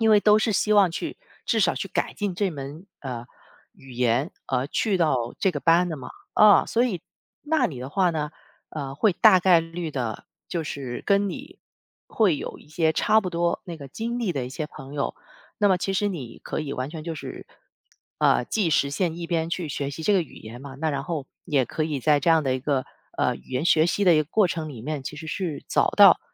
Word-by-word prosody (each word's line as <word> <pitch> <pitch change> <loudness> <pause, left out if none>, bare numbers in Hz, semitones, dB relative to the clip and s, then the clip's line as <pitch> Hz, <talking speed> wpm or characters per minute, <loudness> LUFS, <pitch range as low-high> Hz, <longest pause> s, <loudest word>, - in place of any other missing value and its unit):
因 225 -1 +4
为 210 - +6
都 210 +1 +5
是 220 0 +1
希 210 +2 +2
望 195 -3 +5
去， 165 - -5 0.3
至 230 - +2
少 - - +3
去 195 - -4
改 - - -1
进 205 -3 -2
这 195 +1 0
门， 145 +4 -8
呃， 125 -4 -5 0.5
语 135 -1 -15
言， 125 +5 +1 0.2
而 130 0 0
去 205 +2 +1
到 130 -8 +1
这 195 - +2
个 155 - -3
班 175 +2 +4
的 160 - -4
嘛。 135 - -9 0.2
啊， 210 -2 +7
所 235 +2 +2
以 200 -9 -2 0.4
那 315 +2 +2
里 130 -6 -7
的 130 - -5
话 185 +1 +2
呢， 150 -2 -2 0.4
呃， 140 -3 -5
会 195 +7 +3
大 185 - +6
概 175 -2 +5
率 165 0 -5
的 120 -6 -4 0.2
就 170 -3 -2
是， 135 -4 -5
跟 200 -1 +3
你 275 +8 -9 0.5
会 200 -9 +2
有 - - -6
一 - - -19
些 160 0 +1
差 215 +6 +3
不 185 - -3
多 170 0 0
那 170 -2 -7
个 140 -1 -9
经 235 - -4
历 220 -7 -1
的 135 -3 -2
一 - - -8
些 155 +2 -4
朋 135 -1 -11
友， 140 - -2 0.4
那 205 - +3
么 185 -2 +3
其 195 - -2
实 205 +2 +1
你 135 - -6
可 - - -3
以 145 -2 -4
完 130 +3 -3
全 160 -2 -7
就 165 -1 -4
是， - - -8 0.7
呃， - - +3
既 205 -6 0
实 140 -2 +2
现 165 +1 -1
一 170 -1 -5
边 165 -1 0
去 175 -2 -2
学 140 0 -3
习 160 +3 -7
这 210 - +2
个 195 - +4
语 160 - -14
言 115 +3 -10
嘛， 135 -1 -9
那 160 +1 -1
然 140 0 -3
后 155 -5 -4 0.2
也 140 -4 +2
可 155 - -2
以 150 -3 -2
在 150 +1 +3
这 170 - 0
样 160 -1 +5
的 130 -1 +1
一 130 - -3
个， 135 -1 0 0.3
呃， - - +2
语 - - -19
言 130 +4 -1
学 160 -2 +4
习 200 +3 0
的 175 -3 +6
一 - - +4
个 155 - +2
过 200 +7 +3
程 160 -3 -3
里 120 -6 -9
面， 150 +1 -3
其 150 - -6
实 160 +1 -8
是 170 -3 -4
找 - - +2
到， - - +8
160 Hz, 255 characters per minute, -25 LUFS, 140-190 Hz, 0.7 s, 到